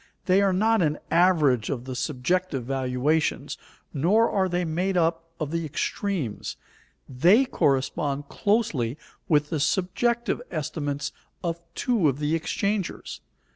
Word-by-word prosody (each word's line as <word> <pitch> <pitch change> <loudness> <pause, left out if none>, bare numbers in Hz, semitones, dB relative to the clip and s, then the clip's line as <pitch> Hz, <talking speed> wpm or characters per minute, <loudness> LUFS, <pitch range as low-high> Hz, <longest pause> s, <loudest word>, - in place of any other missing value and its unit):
They 190 +1 +4
are 200 -1 +3
not 220 +3 +3
an 150 -2 +1
average 160 - +3
of 125 -3 -3
the 130 -1 -5
subjective 145 +2 -1
valuations, 135 +4 0 0.4
nor 200 +11 +3
are 190 -2 +1
they 175 0 0
made 180 +4 0
up 165 -1 +1
of 155 -2 -3
the 165 0 -1
extremes. 155 - -3 0.5
They 180 - +4
correspond 140 - 0
closely 155 - 0 0.3
with 150 0 +2
the 160 - 0
subjective 235 +11 0
estimates 145 -2 -3 0.3
of 170 -1 -2 0.2
two 225 - +2
of 135 - -2
the 150 +1 -1
exchangers. 200 +4 -2
165 Hz, 130 wpm, -25 LUFS, 140-185 Hz, 0.5 s, They